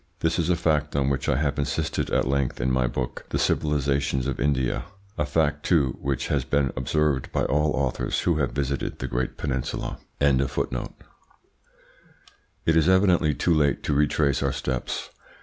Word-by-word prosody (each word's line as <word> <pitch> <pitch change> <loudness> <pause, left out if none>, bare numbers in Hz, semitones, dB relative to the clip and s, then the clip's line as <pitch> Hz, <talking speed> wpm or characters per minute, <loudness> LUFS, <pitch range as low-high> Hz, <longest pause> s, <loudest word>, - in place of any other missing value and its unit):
This 80 +2 +1
is 85 0 0
a 90 - +4
fact 75 -3 0
on 70 -1 +2
which 65 -1 -1
I - - +3
have 70 -1 0
insisted 70 - -1
at - - +1
length 70 -2 0
in 65 +2 +1
my 65 -1 +2
book, 60 0 -4
"The - - -1
Civilisations 70 -3 +1
of 70 -2 -2
India" 65 -3 0 0.3
a 75 - -1
fact, 75 -1 +1
too, 70 -8 +2
which 70 -2 -2
has 70 -3 +1
been 70 0 0
observed 70 +1 0
by - - 0
all 75 +2 +2
authors 70 -3 -1
who 85 -3 +1
have 70 -4 0
visited 70 -1 -2
the - - -4
great 60 +2 -2
peninsula. 65 -4 -3 0.2
It 70 -2 +4 2.3
is 80 +2 +4
evidently 90 -5 +4
too 85 - +2
late 75 -3 +2
to 75 - 0
retrace 75 0 +2
our - - +1
steps. 65 -2 -3
70 Hz, 165 wpm, -25 LUFS, 65-75 Hz, 2.3 s, a